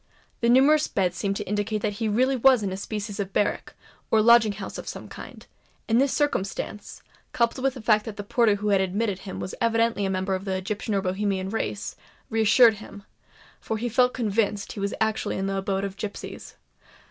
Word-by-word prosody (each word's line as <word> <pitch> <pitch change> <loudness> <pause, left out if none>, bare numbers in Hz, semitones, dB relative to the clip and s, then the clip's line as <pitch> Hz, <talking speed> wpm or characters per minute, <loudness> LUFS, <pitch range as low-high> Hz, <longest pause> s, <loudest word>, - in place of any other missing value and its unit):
The 235 - +1
numerous 285 +5 +5
beds 180 -3 0
seemed 195 +2 -1
to 210 - -3
indicate 210 +1 -2
that 210 - 0
he 225 - 0
really 255 +6 +2
was 255 -2 +4
in 195 - -2
a - - -3
species 205 +1 -5
of 200 -1 -3
barrack, 205 - -1 0.3
or 220 - +4
lodging 225 -1 +6
house 195 -1 -7
of - - -9
some - - -7
kind; - - -11 0.4
and 230 +2 +3
this 275 -1 +2
circumstance, 210 -7 -2 0.3
coupled 235 +2 0
with 270 -1 +1
the 250 - -9
fact 215 -2 +3
that 220 -3 -7
the 205 - -5
porter 215 0 +2
who 210 +1 -2
had 195 -2 +3
admitted 195 +1 -1
him 195 -1 -7
was 185 - -5
evidently 230 -2 +2
a 195 - 0
member 190 +1 -1
of 190 +1 -3
the 190 -1 -1
Egyptian 205 +2 -3
or 195 - 0
Bohemian 190 0 -1
race, 105 - -3 0.4
reassured 225 +1 +5
him—for 210 +1 -10
he 240 +3 -2
felt 250 +2 +2
convinced 210 -3 -1
that - - -6
he - - -7
was 200 0 -2
actually 220 0 -1
in 190 - -2
the 195 0 -1
abode 195 0 -1
of 200 0 -5
gipsies. 210 -1 -7
210 Hz, 205 wpm, -25 LUFS, 195-230 Hz, 0.4 s, lodging